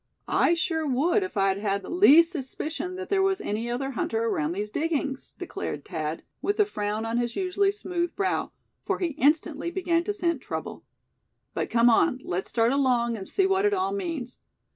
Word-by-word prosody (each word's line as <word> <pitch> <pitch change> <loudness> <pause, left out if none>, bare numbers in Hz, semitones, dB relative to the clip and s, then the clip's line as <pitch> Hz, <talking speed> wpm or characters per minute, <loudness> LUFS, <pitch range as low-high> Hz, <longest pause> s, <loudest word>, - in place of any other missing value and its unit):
"I 340 - +3
sure 325 -2 -1
would 300 +10 +2
if 380 - -4
I'd 195 0 +2
had 200 -1 -1
the - - -8
least 335 -2 +7
suspicion 315 +3 -4
that 375 0 -6
there 395 -1 +2
was 385 0 +2
any 230 - -3
other 270 +3 -2
hunter 225 -2 -1
around 155 -8 0
these 210 +3 -4
diggings," 295 -3 -2
declared - - -5
Thad, 160 -3 -4 0.2
with 405 +2 -1
a 420 - +6
frown 210 - -3
on 230 +1 0
his 240 -1 -2
usually 390 +1 +1
smooth 350 -4 -3
brow; 390 -1 -1 0.3
for - - -1
he 355 - -1
instantly 305 +3 +1
began 345 -2 0
to - - 0
scent 340 -7 0
trouble. - - -5 0.7
"But - - -2
come 230 0 +4
on, 250 +3 +3
let's 180 +2 -3
start 230 0 +2
along, 250 -4 +2
and 195 -3 -7
see 390 - +2
what 385 0 +2
it 410 0 +3
all 380 +1 0
means. 330 -11 -4
300 Hz, 190 wpm, -26 LUFS, 230-365 Hz, 0.7 s, least